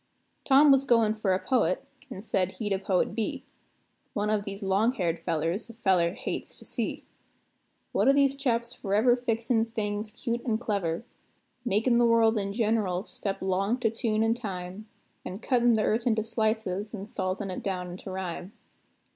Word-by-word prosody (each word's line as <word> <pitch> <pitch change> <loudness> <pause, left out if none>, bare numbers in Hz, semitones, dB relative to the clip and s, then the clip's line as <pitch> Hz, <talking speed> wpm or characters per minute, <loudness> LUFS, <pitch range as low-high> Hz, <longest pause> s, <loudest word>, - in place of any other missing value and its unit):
Tom 280 +2 +7
was 270 0 +5
goin' 230 -5 +3
for 215 -3 -1
a 185 - +3
poet, 195 -5 +1 0.2
an' 190 - -8
said 190 -4 0
he'd 205 -3 -2
a 190 - 0
poet 190 -1 +1
be; 225 0 -2 0.7
One 210 +1 0
of 210 -1 0
these 200 0 -6
long 200 +5 +2
haired 170 -7 -1
fellers 165 +7 -2
a 230 - -11
feller 185 -6 +2
hates - - -5
to - - -13
see; - - -3 0.9
One - - +2
of 275 - +6
these 275 -1 +4
chaps 240 -3 -1
forever 220 +2 +2
fixin' 230 -1 0
things 215 -1 -3
cute 235 +1 -3
and 220 -3 0
clever; 200 -4 -2 0.6
Makin' 235 +2 +2
the 240 - +5
world 225 -1 +4
in 200 0 -2
gen'ral 210 -4 0
step 195 -3 -4
'long 195 +5 +1
to 225 - +2
tune 225 -1 0
an' 225 0 +3
time, 195 -3 -6 0.4
An' 185 - -6
cuttin' 240 +1 +3
the 215 - +1
earth 230 +4 +1
into 220 -2 +2
slices 220 -2 -1
an' 195 -1 -6
saltin' 190 -1 -3
it 180 - -5
down 180 -2 -3
into 185 +2 -8
rhyme. 185 +1 -5
215 Hz, 175 wpm, -28 LUFS, 190-230 Hz, 0.9 s, Tom